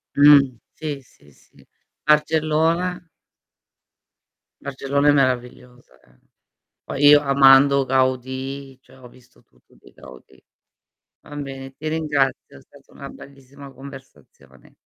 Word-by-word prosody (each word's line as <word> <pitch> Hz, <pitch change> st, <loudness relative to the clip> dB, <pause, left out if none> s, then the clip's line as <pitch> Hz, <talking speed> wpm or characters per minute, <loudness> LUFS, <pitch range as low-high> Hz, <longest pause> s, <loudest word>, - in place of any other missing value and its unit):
Mh, 140 Hz, -3 st, +5 dB, 0.2 s
sì, 150 Hz, -3 st, -6 dB
sì, 75 Hz, -, -24 dB
sì. -, -, -25 dB, 0.4 s
Barcellona? 160 Hz, +3 st, 0 dB, 1.6 s
Barcellona 140 Hz, +1 st, -1 dB
è -, -, +7 dB
meravigliosa 125 Hz, -, -3 dB
eh. 60 Hz, 0 st, -29 dB, 0.7 s
Poi 140 Hz, +1 st, -4 dB
io 145 Hz, 0 st, +7 dB
amando 140 Hz, 0 st, +4 dB
Gaudì, 130 Hz, +1 st, -3 dB
cioè 135 Hz, -, -22 dB
ho 125 Hz, -, -14 dB
visto 125 Hz, 0 st, -23 dB
tutto 60 Hz, -, -31 dB
di -, -, -21 dB
Gaudì. 65 Hz, 0 st, -17 dB, 0.8 s
Va 145 Hz, -, -13 dB
bene, 135 Hz, -2 st, -8 dB
ti 155 Hz, -, -9 dB
ringrazio, 150 Hz, -, -2 dB
è -, -, -15 dB
stata -, -, -22 dB
una -, -, -10 dB
bellissima 140 Hz, 0 st, -15 dB
conversazione. 130 Hz, -, -16 dB
135 Hz, 115 wpm, -21 LUFS, 130-145 Hz, 1.6 s, è